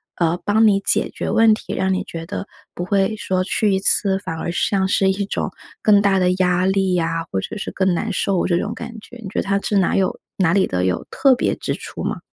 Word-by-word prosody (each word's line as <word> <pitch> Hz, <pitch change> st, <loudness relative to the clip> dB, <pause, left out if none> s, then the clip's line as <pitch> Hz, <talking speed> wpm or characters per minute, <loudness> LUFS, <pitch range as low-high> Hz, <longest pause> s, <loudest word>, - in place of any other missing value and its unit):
呃， 170 Hz, 0 st, 0 dB
帮 220 Hz, +2 st, +4 dB
你 200 Hz, -2 st, +3 dB
解 200 Hz, -, +2 dB
决 -, -, -4 dB
问 225 Hz, -1 st, +5 dB
题？ 215 Hz, -, -5 dB
让 190 Hz, 0 st, 0 dB
你 185 Hz, -, -1 dB
觉 165 Hz, -1 st, -7 dB
得， 195 Hz, -, -5 dB, 0.3 s
不 175 Hz, -, -5 dB
会 200 Hz, +2 st, +1 dB
说 185 Hz, -2 st, -1 dB
去 205 Hz, +2 st, +1 dB
一 190 Hz, -, +1 dB
次 195 Hz, 0 st, +3 dB
反 165 Hz, -4 st, -5 dB
而 -, -, -3 dB
像 190 Hz, +2 st, 0 dB
是 190 Hz, 0 st, +2 dB
一 200 Hz, +1 st, -2 dB
种 -, -, -3 dB, 0.3 s
更 205 Hz, -2 st, +5 dB
大 200 Hz, -1 st, +3 dB
的 180 Hz, 0 st, +3 dB
压 180 Hz, 0 st, +2 dB
力 190 Hz, -1 st, +1 dB
啊， 165 Hz, -1 st, -1 dB
或 95 Hz, -, 0 dB
者 -, -, -6 dB
是 210 Hz, -, -4 dB
更 190 Hz, -1 st, +1 dB
难 215 Hz, +6 st, -2 dB
受 190 Hz, -1 st, 0 dB
这 175 Hz, -, +2 dB
种 210 Hz, +5 st, -2 dB
感 235 Hz, 0 st, -8 dB
觉。 240 Hz, -, -13 dB
你 225 Hz, -4 st, -9 dB
觉 -, -, -2 dB
得 -, -, 0 dB
他 200 Hz, 0 st, 0 dB
是 205 Hz, -, 0 dB
哪 190 Hz, -, +2 dB
有 190 Hz, -1 st, 0 dB, 0.2 s
哪 180 Hz, -4 st, +2 dB
里 195 Hz, -, +3 dB
的 90 Hz, 0 st, -1 dB
有 90 Hz, -2 st, -1 dB
特 270 Hz, -2 st, +4 dB
别 -, -, 0 dB
之 -, -, -3 dB
处 -, -, -8 dB
吗？ -, -, -3 dB
190 Hz, 265 characters per minute, -20 LUFS, 180-205 Hz, 0.3 s, 问